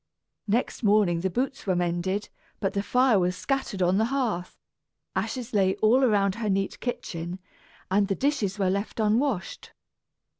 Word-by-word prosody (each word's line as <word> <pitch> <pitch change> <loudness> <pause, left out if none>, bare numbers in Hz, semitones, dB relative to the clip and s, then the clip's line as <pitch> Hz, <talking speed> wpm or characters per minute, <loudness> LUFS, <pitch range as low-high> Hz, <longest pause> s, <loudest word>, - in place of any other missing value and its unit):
Next 230 +5 0
morning 205 -6 +3
the 190 +3 0
boots 255 +5 -3
were 185 - +2
mended, 175 +3 -1 0.3
but 195 - -1
the 200 - 0
fire 250 0 +3
was 180 0 +1
scattered 265 -9 -1
on 180 +3 +3
the 220 - +3
hearth, 235 -9 -2 0.6
ashes 250 -4 -3
lay 190 -2 +3
all 240 +5 +4
about 200 -5 +3
her 215 - 0
neat 195 0 -1
kitchen, 175 -7 -4 0.5
and 200 +1 +3
the 195 - 0
dishes 225 -8 0
were 190 -2 +1
left 200 +4 -3
unwashed. 220 -1 0
200 Hz, 155 wpm, -26 LUFS, 185-240 Hz, 0.6 s, all